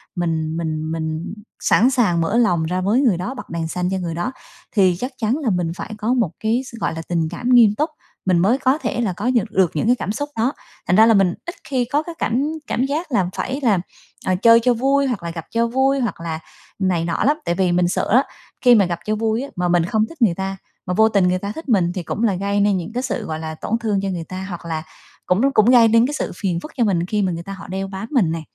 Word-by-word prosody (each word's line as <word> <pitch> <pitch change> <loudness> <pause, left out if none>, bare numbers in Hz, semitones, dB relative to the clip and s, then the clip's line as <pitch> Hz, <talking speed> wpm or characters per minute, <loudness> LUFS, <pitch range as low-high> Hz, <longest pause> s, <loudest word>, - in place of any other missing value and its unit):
mình 165 -2 -1
mình 155 -1 -3
mình 160 +1 -3 0.3
sẵn 240 +5 +4
sàng 215 -11 +2
mở 195 +8 0
lòng 180 -9 +3
ra 180 +3 -1
với 210 +8 +2
người 230 -10 +3
đó, 180 +9 -4
bật 260 - -9
đèn 165 -1 -3
xanh 180 +2 -2
cho 190 - 0
người 175 -3 -3
đó, 175 +9 -2 0.4
thì 190 -4 +3
chắc 250 +2 -3
chắn 230 +3 0
là 290 -7 -1
mình 175 -4 0
phải 205 +3 -7
có 220 +3 0
một 230 -10 +1
cái 225 +3 +1
s 240 - -10
gọi - - -1
là, 165 - -4
tình 165 -2 0
cảm 210 +9 -4
nghiêm 235 -5 +6
túc, 305 +8 0 0.4
mình 185 -2 +3
mới 205 +9 +3
có 265 +1 +2
thể 240 - -2
là 210 -6 0
có 200 +7 -4
nhược 235 -5 0
được 185 -3 +2
những 155 - 0
cái 245 - +5
cảm 205 - -3
xúc 290 +7 -3
đó. 240 +5 +1 0.3
Thành 180 - +3
ra 220 +2 +7
là 225 - +5
mình 195 -4 +3
ít 345 - -6
khi 255 -3 -1
có 285 +5 0
cái 340 +1 -8
cảm 240 +4 +1 0.2
cảm 255 - 0
giác 300 +4 -3
là 190 -7 +1
phải 265 +2 -3
làm, 205 -8 +3 0.4
à, 185 - +2
chơi 230 +5 +6
cho 250 0 +4
vui 275 +4 +2
hoặc 235 -9 -3
là 170 - -4
gặp 165 -1 -7
cho 230 0 +1
vui 265 +3 +2
hoặc 235 -9 -2
là 160 -1 -4 0.4
này 180 -4 +1
nọ 170 -1 -1
lắm, 295 +3 +3
tại 170 - 0
vì 185 -1 +1
mình 175 0 +2
sợ 175 - -1
á, 255 +5 +5 0.4
khi 245 -2 +7
mà 205 -3 +5
gặp 170 -1 -3
cho 215 - 0
vui 220 +1 0
á, 280 - -6
mà 180 0 0
mình 175 -1 +2
không 215 +4 +1
thích 330 -5 -14
người 200 -8 +4
ta, 195 +1 -4 0.3
mà 180 - -2
vô 220 +4 +4
tình 200 -4 +3
người 180 0 +1
ta 200 +2 -4
thích 320 -3 -8
mình, 185 -7 +3
thì 180 - -4
cũng 210 - -3
là 210 -5 +2
gây 200 +2 -1
nên 200 -1 +3
những 175 +4 -6
cái 250 +1 -2
sự, 255 -4 -3
gọi 155 -3 -4
là, 160 0 -5
tổn 220 +8 -2
thương 215 -3 0
cho 195 - -2
người 175 -3 -3
ta 185 +3 -6
hoặc 175 -2 -7
là 160 -1 -3 0.4
cũng 180 +4 +2
nó 275 - +4
cũng 215 - +5
gây 240 -2 +7
nên 230 +1 +4
cái 290 - -4
sự 295 - -3
phiền 180 -4 -1
phức 305 - -9
cho 245 - +3
mình 180 -6 +1
khi 210 +3 -1
mà 190 -2 +1
người 170 0 -5
ta 195 - -7
họ 195 +1 -10
đeo 190 +1 -3
bám 195 +2 -6
mình 220 - +2
nè, 165 0 -3
200 Hz, 285 wpm, -20 LUFS, 175-240 Hz, 0.4 s, ra